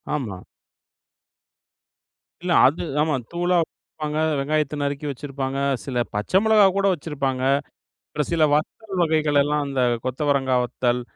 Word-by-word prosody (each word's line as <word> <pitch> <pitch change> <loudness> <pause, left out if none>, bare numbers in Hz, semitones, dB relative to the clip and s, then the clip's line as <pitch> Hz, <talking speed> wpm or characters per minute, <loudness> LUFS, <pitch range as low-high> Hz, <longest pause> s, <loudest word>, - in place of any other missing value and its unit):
ஆமா. 105 -11 -4 2.0
இல்ல, 180 - -1 0.2
அது 145 +5 -1 0.2
ஆமா. 155 -1 +1 0.2
தூளா 175 +1 0
வப்பாங்க, 150 -1 -6 0.2
வெங்காயத்தை 150 +1 0
நறுக்கி 140 +1 -3
வச்சிருப்பாங்க, 135 0 -4 0.3
சில 125 -3 0
பச்சை 105 - +1
மிளகா 220 -2 +6
கூட 200 - +1
வச்சிருப்பாங்க. 140 -5 -3 0.7
ஒரு 150 - +1
சில 160 -2 +4
வத்தல் 190 +6 -2
வகைகளல்லாம், 150 -2 +2
அந்த 135 -2 -1 0.2
கொத்தவரங்கா 135 0 +1
வத்தல், 125 0 -1
145 Hz, 115 wpm, -23 LUFS, 135-155 Hz, 2.0 s, மிளகா